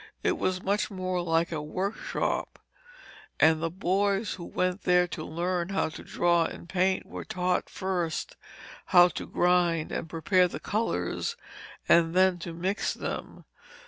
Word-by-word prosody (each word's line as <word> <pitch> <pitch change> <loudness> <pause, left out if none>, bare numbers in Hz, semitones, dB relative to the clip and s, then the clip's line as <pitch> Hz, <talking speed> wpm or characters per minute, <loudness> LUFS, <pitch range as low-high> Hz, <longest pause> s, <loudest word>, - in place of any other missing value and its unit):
It - - +1
was 185 0 -1
much 200 +2 0
more 185 -2 -2
like 165 0 +1
a 155 -2 -2
workshop, 185 +8 -2 0.8
and 160 0 +5
the 165 - 0
boys 195 +3 0
who 175 - -8
went 185 +1 -1
there 180 0 +4
to - - -5
learn 175 +2 -2
how 195 -4 0
to 155 - -10
draw 170 -1 +2
and 170 - -7
paint 185 +1 +1
were - - -7
taught 180 0 -1
first 180 -4 -3 0.5
how 175 -1 +7
to - - -6
grind 175 -2 +2
and 165 - -4
prepare 180 +3 +3
the - - -7
colours 230 - -2 0.5
and 170 0 +4
then 185 -1 +4
to 170 0 -6
mix 185 +5 -1
them. - - -6
180 Hz, 150 wpm, -28 LUFS, 170-190 Hz, 0.8 s, how